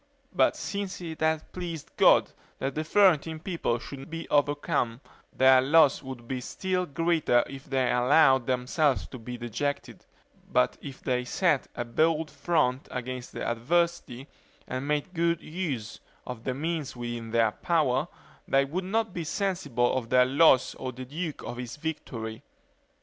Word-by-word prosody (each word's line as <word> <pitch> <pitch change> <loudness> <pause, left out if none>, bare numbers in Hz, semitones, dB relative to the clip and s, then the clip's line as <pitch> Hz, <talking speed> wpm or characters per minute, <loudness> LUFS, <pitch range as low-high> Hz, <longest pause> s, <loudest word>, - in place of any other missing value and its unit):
But 185 - +3
since 200 0 -4
it 165 -3 -7
had 160 0 0
pleased 170 -4 -6
God, - - +5 0.3
that 135 +1 -2
the 155 - -2
Florentine 165 -3 +3
people 165 -9 -1
should 135 +3 -9
be 165 +1 -6
overcome, 145 -4 +1 0.3
their 130 0 +6
loss 145 +1 +4
would 130 -3 -9
be 130 -1 -3
still 185 +6 -2
greater 160 -5 +2
if 135 0 -10
they 130 -2 +1
allowed 130 0 +4
themselves 130 +3 +1
to 130 - -9
be 125 +2 -7
dejected; 120 +5 -4 0.5
but 65 - +2
if 135 -2 -9
they 125 -1 0
set 150 +3 +1
a 120 - -3
bold 155 +6 +1
front 140 -3 0
against 125 0 -6
adversity, 135 +1 -1 0.4
and 130 +2 -4
made 150 +4 -1
good 170 -1 +1
use 155 -12 -4 0.3
of 125 -3 -7
the 130 - -1
means 155 -1 -3
within 120 -1 -5
their 115 -1 +3
power, 145 - +1 0.4
they 135 0 +3
would 180 +7 -3
not 220 +1 -1
be 170 - -3
sensible 160 - 0
of 120 -3 -3
their 125 0 +5
loss 135 -1 +4
or 130 - -5
the 130 +1 -8
duke 155 +3 -5
of 120 - -6
his 125 -1 -6
victory. 125 -8 -5
140 Hz, 155 wpm, -28 LUFS, 125-165 Hz, 0.5 s, their